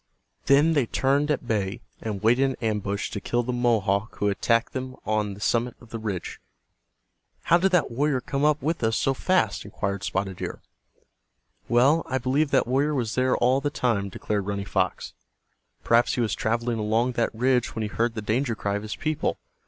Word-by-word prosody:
Then 145 +4 +5
they 140 -6 +2
turned 140 +5 +1
at 145 -4 0
bay, 105 0 -1 0.2
and 105 -3 -4
waited 120 +4 +4
in 135 -1 -1
ambush 100 -1 -2
to 105 - -4
kill 120 +4 0
the 125 +1 -3
Mohawk 110 -4 +1
who - - -1
had 100 - -2
attacked 115 0 +1
them 130 0 -5
on 105 -2 -1
the - - -13
summit 120 +3 0
of 120 - -17
the 115 - -4
ridge. 105 -5 -4 1.0
"How 170 +1 +4
did 190 +2 +2
that 175 -8 +3
warrior 140 +2 +1
come 140 +2 -3
up 150 -1 +2
with 160 -2 -1
us 110 0 +2
so 135 - +1
fast?" 135 - +1
inquired 100 -1 -4
Spotted 95 -1 -2
Deer, - - -6 1.1
"Well, 135 +8 +4
I 130 - 0
believe 135 +4 +1
that 135 -1 +3
warrior 140 +4 +1
was 120 -4 -1
there 130 0 +2
all 130 +3 +3
the 145 - 0
time," 115 -8 0
declared 100 +1 -3
Running 100 -1 -2
Fox. 95 -2 -1 0.7
"Perhaps 115 +1 +3
he 125 - 0
was 115 - 0
traveling 115 +1 -1
along 110 +4 +1
that 120 -1 0
ridge 125 +1 +1
when 110 - -2
he - - -1
heard 115 +2 -1
the 110 - -4
danger 115 +3 0
cry 100 -1 -2
of - - -6
his 105 0 -5
people. 155 0 -1
120 Hz, 200 wpm, -25 LUFS, 105-135 Hz, 1.1 s, Then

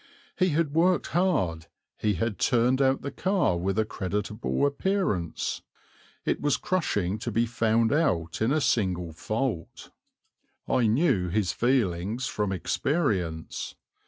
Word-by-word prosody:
He 185 -1 +2
had 155 -2 0
worked 175 +3 +3
hard; 95 - 0 0.3
he 105 -2 0
had 105 +2 -2
turned 125 +3 +3
out 135 0 +2
the 140 - -3
car 185 - +1
with 95 +3 -1
a 110 - +2
creditable 105 +7 -2
appearance; 140 - -1 0.6
it - - 0
was 145 -2 +2
crushing 105 - -1
to 120 - -3
be 115 +2 +2
found 115 0 +1
out 85 - 0
in 110 +4 +2
a 155 +1 +2
single 90 - 0
fault. 110 - -3 0.8
I 120 -3 +2
knew 110 - +2
his 95 -1 +1
feelings 115 -2 0
from 105 -7 -1
experience. 95 - -1
115 Hz, 130 wpm, -27 LUFS, 95-140 Hz, 0.8 s, worked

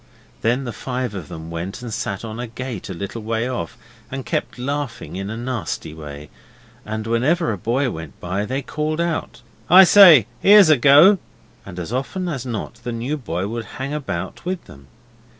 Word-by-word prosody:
Then 120 +4 +1
the 120 -3 -5
five 125 0 -4
of 90 -7 -6
them 80 0 -8
went 90 +8 -5
and 115 -3 -5
sat 100 -2 -3
on 110 +1 -6
a 120 - -4
gate 120 -3 -6
a - - -4
little 100 +6 -6
way 115 +2 -1
off 125 0 -4 0.3
and 135 0 -5
kept - - -2
laughing 135 -6 -4
in 95 +1 -4
a 110 - -5
nasty 120 -10 -4
way, 75 -1 -9 0.5
and 110 0 -4
whenever 125 +6 +1
a 105 - -3
boy 125 +6 0
went 80 -3 -9
by 90 +3 -2
they 135 +4 -3
called 155 +3 -3
out 170 -7 -2 0.3
'I 185 +3 +10
say, 175 - +8 0.2
'ere's 200 -3 +8
a 155 - +6
go,' 150 - +7 0.5
and 90 -2 -9
as 90 +5 -5
often 180 +8 -2
as 135 -7 -4
not 115 0 -5
the 120 - -3
new 120 +6 -2
boy 95 - -3
would 115 +1 -4
hang 135 +2 -4
about 95 -12 -4
with 180 0 -4
them. 70 -1 -15
120 Hz, 190 wpm, -21 LUFS, 100-140 Hz, 0.5 s, I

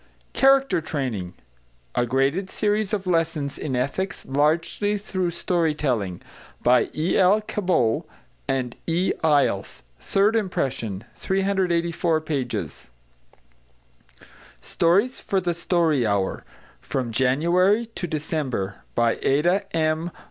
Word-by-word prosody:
=Character 270 -8 +4
Training= 125 - -4 0.6
A 120 - +1
Graded 135 +10 +1
Series 210 0 0
of 200 -3 -2
Lessons 165 -5 -1
in 135 -4 -3
Ethics, 140 +10 -2
largely 160 +9 +1
through 185 -3 -2
Story 170 -2 0
telling. 110 - -2 0.4
By 125 +1 +4
E.L. 185 +6 +3
CABOT 180 - 0 0.4
and 125 -2 -1
E. 175 +3 +1
EYLES. 140 -11 +1 0.2
Third 200 - +2
Impression. 130 - -2
384 175 -4 0
pages. 125 - -4 1.7
=Stories 200 +10 +1
for 195 - 0
the 175 -2 -1
Story 165 -5 +1
Hour= 100 -2 -1 0.3
From 125 -3 -3
January 170 - +2
to 225 -5 -5
December. 145 - -3 0.2
By 120 -1 +2
ADA 175 +8 +1
M. 160 +1 0
160 Hz, 105 wpm, -24 LUFS, 130-190 Hz, 1.7 s, =Character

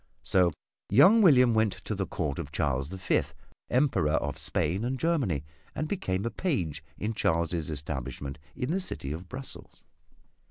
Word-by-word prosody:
So 90 -2 +3 0.4
young 185 - +7
William 125 - +6
went 110 -2 +3
to 95 +3 -5
the 95 -2 -2
Court 75 -5 -2
of - - -5
Charles 70 0 0
the 95 - -6
Fifth, 90 - 0 0.3
Emperor 125 - +2
of - - -1
Spain 90 +7 0
and 130 +2 -2
Germany, 130 - +1 0.3
and 155 - -2
became 100 - -2
a 115 - -1
page 85 - -2
in 110 +2 -2
Charles' 85 -4 0
establishment 70 -2 -5 0.2
in 125 +4 -2
the 185 - +1
city 70 - -5
of 85 +4 -6
Brussels. 130 +1 -7
95 Hz, 160 wpm, -29 LUFS, 75-130 Hz, 0.4 s, young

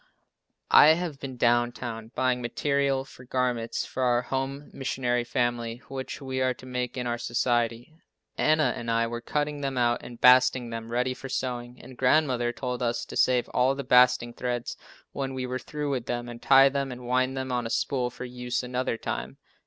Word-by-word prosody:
I 145 - +9
have 165 -4 -4
been 130 -3 -7
down 120 0 +3
town 115 -2 -7
buying 130 -1 +1
material 140 +2 0
for 125 - -14
garments 125 -2 -1
for 130 - -5
our 125 -1 +2
Home 135 +3 -4
Missionary 125 -2 -1
family 120 -1 -2
which 135 -1 -5
we 130 -2 -3
are 130 -1 +1
to - - -14
make 125 0 -3
in 125 - -2
our 120 0 -2
society. 120 +1 -1 0.4
Anna 155 -4 +3
and 120 - -5
I 115 0 +2
were 120 0 -4
cutting 145 +3 -2
them 135 -2 -2
out 120 -1 +2
and 120 -1 -10
basting 125 -1 +5
them 115 0 -6
ready 125 +2 0
for 135 +1 -9
sewing, 125 -1 -4
and 130 +1 -12
grandmother 125 -2 +2
told 125 0 -4
us 120 -1 -1
to - - -9
save 125 -1 +3
all 130 +2 +2
the 140 - -4
basting 125 -1 +4
threads 120 -1 -3 0.4
when 135 -1 -4
we 130 -1 -3
were 125 0 -3
through 150 0 -4
with 125 -4 -3
them 120 0 -3
and 120 -1 -9
tie 135 0 +7
them 140 -1 -2
and 125 0 -8
wind 130 +2 +1
them 130 0 -3
on 120 -2 -1
a - - -7
spool 125 0 0
for 125 - -8
use 125 0 -3
another 125 -1 -2
time. - - -5
125 Hz, 195 wpm, -27 LUFS, 120-130 Hz, 0.4 s, I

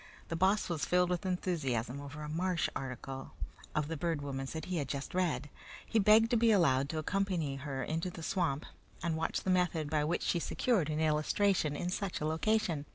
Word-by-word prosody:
The 165 - -1
Boss 190 +5 +3
was 160 -6 -2
filled 180 +5 +3
with 180 +2 -1
enthusiasm 140 -9 -1
over 145 +2 -7
a - - -5
marsh 170 +2 0
article 135 0 -6 0.4
of 150 -1 +1
the 165 - -3
Bird 160 -1 -1
Woman's 135 -1 -4
that 160 - -4
he 175 -5 -1
just 140 0 -4
had 185 - +2
read. 155 -5 -1 0.4
He 225 - +1
begged 215 +3 +6
to 240 - +4
be 230 0 +4
allowed 140 -9 +3
to 160 - -3
accompany 165 -4 -1
her 135 -1 -4
into 165 +3 -2
the 165 -2 -8
swamp 155 -5 0 0.4
and 170 -2 0
watch 160 +1 -1
the 190 - 0
method 170 -4 +1
by 150 -1 +2
which 165 +4 0
she 170 - +1
secured 190 - +1
an 155 0 -1
illustration 155 +1 +2
in 175 +4 -2
such 195 -1 -2
a 150 - -2
location. 160 -2 +1
160 Hz, 205 wpm, -33 LUFS, 145-185 Hz, 0.4 s, begged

